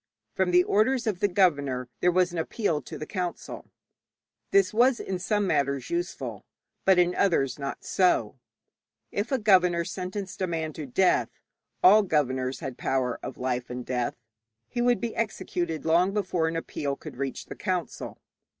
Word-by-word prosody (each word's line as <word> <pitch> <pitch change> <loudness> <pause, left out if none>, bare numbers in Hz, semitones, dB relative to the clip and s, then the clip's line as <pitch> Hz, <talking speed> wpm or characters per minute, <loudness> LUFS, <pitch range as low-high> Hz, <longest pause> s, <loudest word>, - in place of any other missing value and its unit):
From 190 -1 +1
the 180 0 +5
orders 235 +7 +2
of 210 -5 -1
the 205 - +3
governor 145 -10 +1
there 180 - +3
was 180 0 +2
an 175 - -3
appeal 160 -2 -1
to 125 - -8
the 155 - -5
council. 180 -2 -5 0.8
This 395 - +3
was 240 +2 +4
in 190 -2 -3
some 205 +2 0
matters 140 - 0
useful, 345 +1 -3 0.4
but 190 -1 +5
in 180 0 +4
others 145 -10 +1
not 140 0 -5
so. 135 - +1 0.7
If 205 +6 -2
a 265 - +3
governor 180 -6 +4
sentenced 185 +2 -5
a 185 - +1
man 160 -2 -3
to 150 -2 -6
death 180 +9 +2 0.5
all 205 +4 +8
governors 130 -8 0
had 130 -2 -6
power 130 -2 0
of 130 - -7
life 125 -1 -2
and 125 0 -5
death 125 -1 -1 0.5
he 240 - -3
would 245 -1 +2
be 235 -2 -3
executed 175 -7 -2
long 175 +5 +3
before 180 -5 0
an 165 - -2
appeal 145 -3 -3
could - - -10
reach 135 0 -4
the - - -8
council. 180 -5 -3
180 Hz, 170 wpm, -27 LUFS, 140-200 Hz, 0.8 s, all